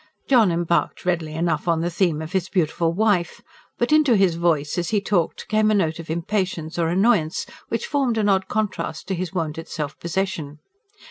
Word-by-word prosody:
John 230 -8 +5
embarked 170 +1 0
readily 165 -4 -1
enough 165 -1 -1
on 165 -1 +2
the 175 +1 -1
theme 165 -3 0
of 160 - -8
his 190 -1 -1
beautiful 165 -2 +1
wife; 190 -2 0 0.3
but 240 - 0
into 305 -6 +5
his 195 -4 +3
voice, 165 -2 0
as 175 - -2
he 215 - +2
talked, 195 -4 -1
came 215 0 +2
a 215 - +3
note 165 -5 0
of 165 - -9
impatience 170 -1 -2
or 165 - +2
annoyance, 185 -3 +2 0.2
which - - -2
formed 270 -6 0
an 210 -1 +2
odd 190 -1 +2
contrast 205 -7 -3
to - - 0
his 180 -1 -3
wonted 165 -3 -3
self 150 -2 -5
possession. 170 -4 -3
175 Hz, 190 wpm, -23 LUFS, 165-205 Hz, 0.3 s, John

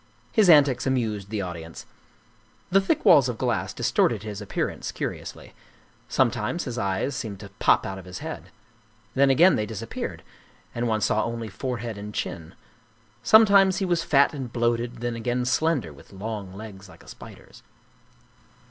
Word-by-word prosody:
His 210 -5 +4
antics 140 -5 +5
amused 110 -7 -1
the 105 -2 -2
audience. 85 -2 -8 0.9
The 195 +2 +5
thick 195 - -1
walls 135 -3 +6
of 120 - -4
glass - - -1
distorted 110 -3 +1
his 105 -1 -6
appearance 105 - -3
curiously; - - -6 0.6
sometimes 130 +11 0
his 125 -4 -5
eyes 100 +7 -1
seemed 105 -4 -5
to 100 -2 -11
pop - - +3
out 95 0 -5
of 95 - -12
his 90 0 -8
head; 160 +1 -7 0.6
then 135 +1 +4
again 170 +8 +5
they 105 - -2
disappeared, 110 -4 -6 0.5
and 120 0 -2
one 110 -1 0
saw 110 0 +1
only 115 -1 -4
forehead 120 -1 -5
and 105 +1 -8
chin; 80 0 -5 0.7
some 220 +1 +7
times 195 -2 +4
he 195 - 0
was 175 -2 0
fat 140 +1 +3
and 130 -5 -6
bloated, 120 0 -1
then 120 -1 -2
again 120 +2 -2
slender, 135 - 0
with 70 - -17
long 100 -1 -6
legs 100 -1 -10
like - - -16
a - - -20
spider's. - - -13
115 Hz, 165 wpm, -25 LUFS, 105-140 Hz, 0.9 s, some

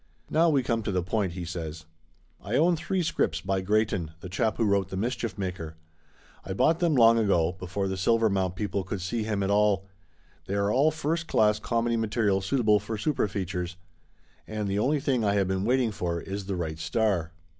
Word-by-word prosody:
"Now 165 +2 +4
we 140 -4 +2
come 115 -3 0
to 105 - -2
the 90 -2 0
point," 95 -1 -1
he 90 -1 -5
says. 80 -2 -6 0.6
"I 105 +4 -2
own 170 +5 +4
three 170 +3 -1
scripts 85 - 0
by 95 +3 -1
Greyton, 100 -4 0
the 90 - -7
chap 110 +4 0
who 115 - +2
wrote 100 -2 +1
The 95 - -5
Mischief 115 +1 -2
Maker. 90 -5 -4 0.7
I 95 - -4
bought 160 - +3
them 170 -4 +2
long 115 -2 +6
ago, 90 -6 +2
before 95 +2 -3
the 95 - -2
Silver 115 +4 +3
mount 95 -3 0
people 100 -1 -2
could 95 +2 -4
see 105 +6 -2
him 105 -2 -1
at 95 - 0
all. 100 -2 +3 0.6
They 100 - -2
are 100 0 +1
all 140 +6 +4
first 160 +2 -2
class 105 -4 +3
comedy 115 +1 0
material 110 -3 +1
suitable 105 +1 +2
for 110 +2 -5
super 130 +1 0
features. 90 -2 -4 0.7
And 105 -1 -3
the 100 +1 0
only 145 +7 +2
thing 135 -5 0
I 100 -1 +2
have 100 -2 +2
been 95 +1 -1
waiting 125 -1 +2
for 85 -4 -2
is 95 +2 -6
the 100 - -2
right 80 -3 -4
star." 85 -1 0
105 Hz, 205 wpm, -27 LUFS, 95-115 Hz, 0.7 s, long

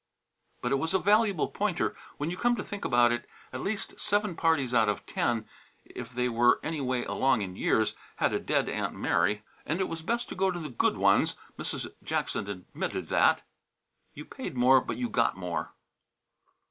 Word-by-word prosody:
But 125 - 0
it 135 - +3
was 165 +6 0
a - - +7
valuable 205 -3 +3
pointer. 200 -4 -1 0.2
When 150 +3 -2
you - - -3
come 240 +5 +2
to 210 - -4
think 205 0 -7
about 120 -1 +4
it, 120 - -3 0.2
at 130 - -4
least 200 0 -3
seven 205 -3 0
parties 160 -7 +2
out 115 -3 +4
of 105 - -2
ten, 115 -2 -1 0.4
if 125 -1 -8
they 125 0 0
were 120 +1 +4
any 155 -2 -2
way 125 -2 -1
along 130 -4 +2
in 95 -2 -4
years, 110 +2 +2 0.2
had - - +1
a - - +1
dead - - +1
Aunt - - -2
Mary. 105 0 +1 0.2
And 160 +4 -2
it 190 - +1
was 165 -1 -5
best 235 +8 -1
to - - -6
go 190 0 +2
to 180 - -2
the 155 -3 -5
good 120 - +1
ones. - - +3 0.2
Mrs. - - -4
Jackson 100 - -2
admitted 90 -3 -4
that. - - +4 0.7
You - - -8
paid - - -7
more, 130 +2 +6
but - - -4
you 125 -1 -1
got 115 -5 +1
more. 85 -4 -3
130 Hz, 195 wpm, -29 LUFS, 120-185 Hz, 0.7 s, a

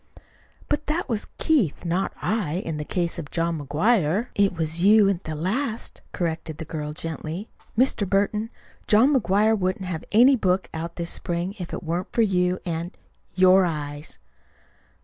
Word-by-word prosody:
"But 295 +1 -1
that 320 +4 -1
was 225 -5 -2
Keith, 250 - +1
not 175 +3 0
I, 205 -9 -1
in 160 -2 -3
the 150 - -3
case 170 +2 -1
of 145 -3 -7
John 165 -1 -1
McGuire." 180 - +1
"It 200 -3 +2
was 165 +1 0
you 210 0 +6
at 190 -2 -2
the 155 - -4
last," 220 - -2
corrected 165 -2 -3
the 160 - -6
girl 150 -1 -4
gently. 165 +5 -5 0.3
"Mr. 235 -6 +2
Burton, 210 +2 +1 0.4
John 235 +8 +5
McGuire 215 -2 +3
wouldn't 185 -1 -1
have 175 -3 -4
any 250 +6 +6
book 185 -5 0
out 165 +1 -5
this 170 -1 -3
spring 175 +2 -2
if 175 - -6
it - - -5
weren't 170 +2 -3
for 230 - +3
you 180 -3 +1
and 170 0 -4 0.4
your 185 +1 +6
eyes." 150 -3 -4
180 Hz, 165 wpm, -24 LUFS, 165-210 Hz, 0.4 s, you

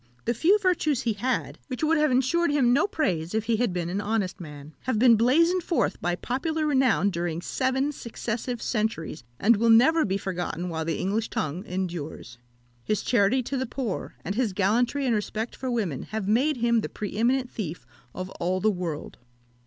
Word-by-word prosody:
The 235 - +1
few 345 - +4
virtues 350 - +1
he 230 - +1
had, 245 +5 -2
which 255 +1 -5
would 320 0 +3
have 305 0 +3
ensured 265 +7 +2
him 265 -4 +3
no 300 +9 +3
praise 200 - -1
if 220 - +1
he 225 0 +1
had 240 -3 +1
been 175 -1 -2
an 190 +4 -2
honest 205 -3 -1
man, 150 -1 -10
have 255 -3 0
been 235 +1 +6
blazoned 330 - +3
forth 335 0 -1
by 175 0 0
popular 310 - -2
renown 260 - +3
during 170 -2 -2
seven 260 +8 0
successive 235 -2 -4
centuries, 210 - -2 0.2
and 225 +1 +4
will 230 +2 +2
never 310 +9 +6
be 195 0 0
forgotten 180 -2 -3
while 160 -1 -3
the 165 - -1
English 210 +4 -1
tongue 160 +5 -3
endures. 170 -9 -5 0.4
His 215 - -1
charity 245 +2 +2
to 270 +3 -3
the 260 0 -2
poor, 235 -5 -4
and 195 - -1
his 225 -3 0
gallantry 235 +8 +1
and 245 - +2
respect 220 +2 -2
for 260 - -4
women, 205 - -1
have 215 -2 -4
made 260 +7 +2
him 235 -1 +2
the - - -4
pre 205 - -6
eminent 245 +3 +1
thief 170 - -5 0.3
of 185 +1 -5
all 180 +2 0
the 215 +3 +3
world. 175 -6 -5
225 Hz, 190 wpm, -26 LUFS, 185-260 Hz, 0.4 s, been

